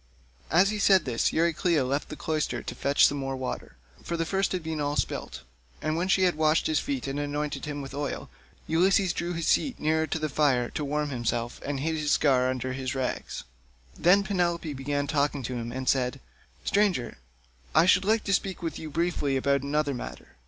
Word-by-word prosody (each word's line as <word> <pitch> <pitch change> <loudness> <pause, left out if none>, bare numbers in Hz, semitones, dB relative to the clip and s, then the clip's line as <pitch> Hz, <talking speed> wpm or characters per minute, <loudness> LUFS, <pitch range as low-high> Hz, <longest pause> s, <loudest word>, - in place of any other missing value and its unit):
As 185 +5 +4
he 210 - -3
said 195 -2 +5
this 120 -3 +1
Euryclea 165 -2 +2
left 140 +3 -2
the - - -6
cloister 155 -1 -2
to - - -5
fetch 140 +1 +4
some 145 - +1
more 135 0 -3
water, 130 - -5 0.3
for 170 - -3
the 165 - 0
first 195 +3 0
had 185 -3 -2
been 160 -1 -3
all 145 0 -1
spilt; 65 - -3 0.4
and 155 0 -1
when 175 +3 0
she 190 0 +3
had 180 -1 +4
washed 155 +1 +2
him 155 - 0 0.3
and 140 +1 -3
anointed 145 +1 -3
him 145 -1 -4
with 135 - -8
oil, 145 -1 -3 0.4
Ulysses 185 +2 +3
drew 170 +1 -3
his 165 -1 -3
seat 265 -4 +2
nearer 160 +1 +1
to - - -1
the 155 -1 -1
fire 135 -4 +1
to 150 - -3
warm 150 +1 -1
himself, 120 -1 -2
and 140 -1 -3
hid 160 +2 -1
the 150 -1 -3
scar 130 -3 +3
under 130 0 -2
his 130 0 -3
rags. 130 -1 -3 0.5
Then 190 +4 +4
Penelope 175 -5 -1
began 145 +1 -2
talking 145 -2 0
to 125 - -4
him 120 -1 -4
and 130 +1 -5
said: 125 -2 +1 0.5
"Stranger, 180 - +1 0.6
I 160 - +6
should 185 +1 +5
like 220 +2 +2
to 195 - 0
speak 185 -1 -1
with 165 - -3
you 160 - -6
briefly 155 -4 0
about 140 +1 +2
another 145 +1 0
matter. 125 - -7
150 Hz, 200 wpm, -27 LUFS, 135-170 Hz, 0.6 s, I